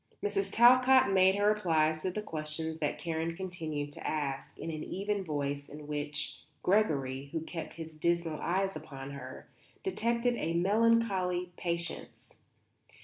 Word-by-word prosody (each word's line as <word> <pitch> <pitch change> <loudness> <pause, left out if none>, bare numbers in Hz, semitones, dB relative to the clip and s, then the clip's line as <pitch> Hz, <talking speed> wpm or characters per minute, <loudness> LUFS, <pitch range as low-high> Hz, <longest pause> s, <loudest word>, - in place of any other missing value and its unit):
Mrs. 400 -1 0
Talcott 255 0 +6
made 190 0 +5
her 205 0 +1
replies 160 -7 +2
to 185 - -1
the 210 +4 -4
questions 160 -1 -3
that 150 -2 -1
Karen 165 0 -2
continued 160 -6 -4
to - - -7
ask, 140 -3 -3
in 165 - -4
an 155 -1 -5
even 200 +1 -2
voice 145 -3 -3
in 150 0 -9
which 145 0 -3 0.2
Gregory, 140 -9 +1
who 160 - -2
kept 160 0 -6
his 160 0 -7
dismal 165 0 0
eyes 190 +2 0
upon 135 -1 -7
her, 130 -2 -9 0.4
detected 235 - +1
a 165 - -1
melancholy 190 -2 +2
patience. 170 -1 -2
165 Hz, 145 wpm, -31 LUFS, 150-195 Hz, 0.4 s, Talcott